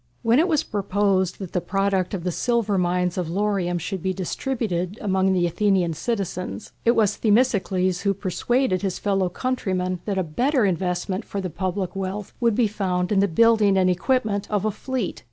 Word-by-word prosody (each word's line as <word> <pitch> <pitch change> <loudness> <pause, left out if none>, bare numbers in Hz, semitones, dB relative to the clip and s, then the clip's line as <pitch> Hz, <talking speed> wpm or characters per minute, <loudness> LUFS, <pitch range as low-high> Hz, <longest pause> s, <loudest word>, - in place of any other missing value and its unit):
When 230 +4 +4
it 335 - +3
was 310 -5 +2
proposed 195 -2 0
that 190 -4 -8
the 180 - 0
product 195 +1 0
of 175 - -5
the 180 - -1
silver 220 -1 0
mines 180 0 0
of 175 - -2
Laurium 190 -2 0
should 190 +3 -4
be 190 +1 -1
distributed 195 -2 -2
among 190 -2 +1
the 180 -2 +2
Athenian 180 -1 +1
citizens, 195 +1 -4
it 235 - +4
was 210 -2 +2
Themistocles 200 -5 +2
who 200 -1 +1
persuaded 200 +2 0
his 195 -3 -2
fellow 195 -3 0
countrymen 185 -5 -2
that 200 -2 -2
a 190 - +1
better 245 - +1
investment 185 +2 -1
for 200 - -5
the 185 -3 -4
public 185 +2 -3
wealth 195 +1 -4
would 235 -3 +2
be 240 - +3
found 185 -3 -1
in 200 - +3
the 200 - +4
building 210 +1 +4
and 185 -1 +4
equipment 205 +2 0
of 210 -1 0
a 215 - +1
fleet. 250 0 -4
195 Hz, 185 wpm, -23 LUFS, 185-215 Hz, -, When